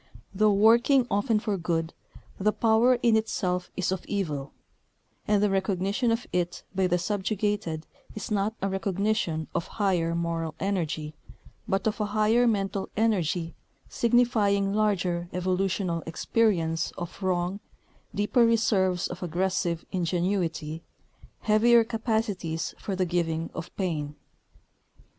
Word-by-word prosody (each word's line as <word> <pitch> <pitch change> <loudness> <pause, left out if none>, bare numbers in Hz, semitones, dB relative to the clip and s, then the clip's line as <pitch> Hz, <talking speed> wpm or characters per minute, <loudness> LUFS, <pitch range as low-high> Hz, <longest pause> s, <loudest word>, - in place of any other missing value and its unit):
Though 210 +2 +4
working 235 +6 +5
often 210 +3 +2
for 210 -2 -2
good, 165 -1 -1 0.5
the 210 +2 +3
power 230 +3 +4
in 230 -2 +5
itself 185 -5 -1
is 185 -1 0
of 190 -1 -2
evil; 150 -9 -2 0.8
and 205 -1 +3
the 210 - +3
recognition 195 +4 0
of 230 +2 0
it 175 -1 -1
by 190 -1 +2
the 180 0 +2
subjugated 200 -3 -2 0.3
is 215 +2 -6
not 210 +2 0
a - - +2
recognition 195 -4 -1
of 170 - -2
higher 180 -5 +1
moral 165 -2 -2
energy, 165 -6 -2 0.5
but 195 0 0
of 215 0 0
a - - +1
higher 225 +3 +4
mental 195 -3 -1
energy 180 -6 +1 0.4
signifying 215 -5 +2
larger 180 -5 0
evolutional 185 -1 0
experience 165 -3 +1
of 175 +3 -7
wrong, 185 +1 0 0.6
deeper 210 +4 +3
reserves 200 -6 +2
of 180 - -8
aggressive 180 0 -1
ingenuity, 170 -3 -1 0.6
heavier 230 +2 +5
capacities 220 -8 -2
for 195 - -3
the 185 0 +1
giving 165 -2 -1
of 165 - -6
pain. 155 -6 -2
190 Hz, 125 wpm, -27 LUFS, 170-215 Hz, 0.8 s, working